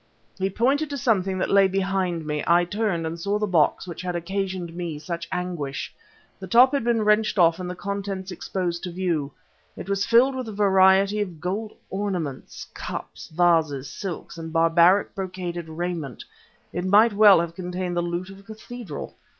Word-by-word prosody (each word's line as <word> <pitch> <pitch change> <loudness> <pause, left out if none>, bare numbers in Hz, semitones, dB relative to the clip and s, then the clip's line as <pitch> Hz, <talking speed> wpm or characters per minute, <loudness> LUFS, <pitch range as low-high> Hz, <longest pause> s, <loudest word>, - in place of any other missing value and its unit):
He 190 +1 0
pointed 275 +9 +1
to 285 - -4
something 195 -7 +1
that 185 - -1
lay 195 -1 +6
behind 190 -3 -1
me. 150 -1 -2
I 175 +1 +4
turned, 200 -3 -1
and 165 +1 -4
saw 200 +4 0
the 210 - 0
box 175 -5 +2
which 170 -2 -6
had 180 -1 -3
occasioned 185 -1 -3
me 170 -3 -4
such 170 +2 -5
anguish. 175 -6 -4 0.5
The 190 - -8
top 245 +7 +6
had 280 - +1
been 230 -2 +1
wrenched 210 0 +2
off 170 -1 +4
and 180 -1 -4
the 180 - -5
contents 195 -1 -4
exposed 175 -1 -3
to 180 - -5
view. 170 -5 -1 0.5
It - - -7
was 200 0 0
filled 245 +5 +4
with 255 -2 -4
a - - -6
variety 195 0 +4
of 180 -6 -5
gold 200 +6 -3 0.2
ornaments, 185 -9 -4
cups, - - -7
vases, 155 -5 +1
silks, 175 -3 -6
and 160 0 -6
barbaric 170 +4 +4
brocaded 180 -3 -5
raiment; 160 -5 -4 0.5
it 175 - -2
might 205 +4 +5
well 200 -3 +7
have 170 0 -2
contained 180 0 -4
the 175 - +1
loot 175 +2 -4
of 195 - -12
a - - -14
cathedral. 220 -4 -8
185 Hz, 180 wpm, -24 LUFS, 170-200 Hz, 0.5 s, well